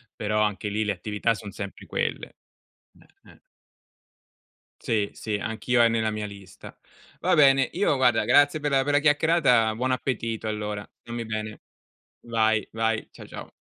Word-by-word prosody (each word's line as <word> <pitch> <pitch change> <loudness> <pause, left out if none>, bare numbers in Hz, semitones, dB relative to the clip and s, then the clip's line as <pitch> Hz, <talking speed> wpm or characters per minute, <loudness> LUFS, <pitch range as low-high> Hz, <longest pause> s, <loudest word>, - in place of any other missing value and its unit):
però 105 0 -1
anche 105 -1 -1
lì, 110 +2 -1
le 105 - 0
attività 105 +4 -1
son 105 -2 -8
sempre 100 0 -8
quelle. - - -3 0.9
Eh, - - -19
eh. - - -20 1.4
Sì, 105 -3 0
sì, 110 -2 -4
anch'io, 115 +3 0
è 115 - +6
nella 110 -1 0
mia 105 0 -4
lista. 100 -1 -12 0.4
Va - - +2
bene, 135 -3 +5
io 180 -6 +2
guarda 120 -4 +3
grazie 145 +5 +4
per 145 -1 -2
la 135 -1 +3
per 145 +1 -1
la 145 - +5
chiacchierata. 145 -7 +3
Buon 130 +3 -1
appetito 115 -3 -2
allora. 105 -1 -4
Stammi 120 0 -6
bene. 110 -1 -5 0.6
Vai, 110 -2 +1
vai. 115 0 -1
Ciao - - -12
ciao. - - -9
110 Hz, 160 wpm, -25 LUFS, 105-130 Hz, 1.4 s, è